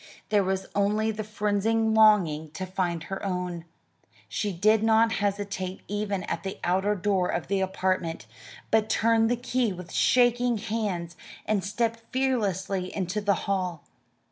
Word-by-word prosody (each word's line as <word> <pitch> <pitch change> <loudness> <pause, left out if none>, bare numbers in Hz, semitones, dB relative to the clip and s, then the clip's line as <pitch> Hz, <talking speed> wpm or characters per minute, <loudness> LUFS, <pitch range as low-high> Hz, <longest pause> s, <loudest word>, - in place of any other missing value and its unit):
There 205 -2 +3
was 190 0 -1
only 210 +2 +1
the 215 0 -4
frenzied 210 +1 0 0.2
longing 190 -9 +4
to 185 +4 -4
find 180 -3 -2
her 195 +2 -6
own. 180 -3 -3 0.6
She 205 - -2
did 210 +5 +3
not 225 +1 +4
hesitate 200 -2 -2
even 205 -2 -2
at 170 - -3
the 195 -1 -5
outer 190 +4 +1
door 190 -1 +1
of 170 - -2
the 195 -1 +1
apartment, 185 - -1 0.5
but 220 0 +3
turned 225 0 +3
the 245 - +2
key 245 -2 0
with 180 -1 -8
shaking 245 -1 +3
hands 205 -6 -3 0.3
and 210 -3 0
stepped 230 +3 -1
fearlessly 200 -8 0
into 190 +2 -2
the 200 -1 +2
hall. 185 -5 -2
200 Hz, 145 wpm, -27 LUFS, 185-220 Hz, 0.6 s, longing